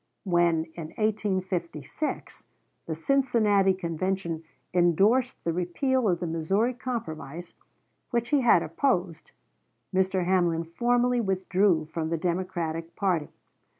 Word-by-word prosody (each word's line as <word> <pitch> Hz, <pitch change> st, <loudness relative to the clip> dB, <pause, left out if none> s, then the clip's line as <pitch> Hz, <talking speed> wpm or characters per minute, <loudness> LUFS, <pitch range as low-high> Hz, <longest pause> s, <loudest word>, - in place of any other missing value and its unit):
When 175 Hz, -3 st, +2 dB
in 165 Hz, -1 st, -8 dB
1856 190 Hz, -, -2 dB, 0.4 s
the 160 Hz, -, -2 dB
Cincinnati 210 Hz, -, +2 dB
Convention 170 Hz, -1 st, -2 dB, 0.3 s
indorsed 195 Hz, +9 st, +3 dB
the 165 Hz, -, 0 dB
repeal 215 Hz, +8 st, 0 dB
of 175 Hz, -2 st, +1 dB
the -, -, -3 dB
Missouri 190 Hz, +9 st, 0 dB
Compromise, 175 Hz, -, -6 dB, 0.6 s
which 235 Hz, -1 st, -1 dB
he 290 Hz, -2 st, +3 dB
had 230 Hz, -8 st, +5 dB
opposed, 175 Hz, -, -1 dB, 0.6 s
Mr. 185 Hz, -1 st, +1 dB
Hamlin 175 Hz, -3 st, +2 dB
formally 245 Hz, +8 st, +1 dB
withdrew 190 Hz, -4 st, +1 dB
from 160 Hz, 0 st, -4 dB
the 165 Hz, -, 0 dB
Democratic 170 Hz, -1 st, -3 dB
party. 180 Hz, -7 st, 0 dB
185 Hz, 110 wpm, -27 LUFS, 165-215 Hz, 0.6 s, had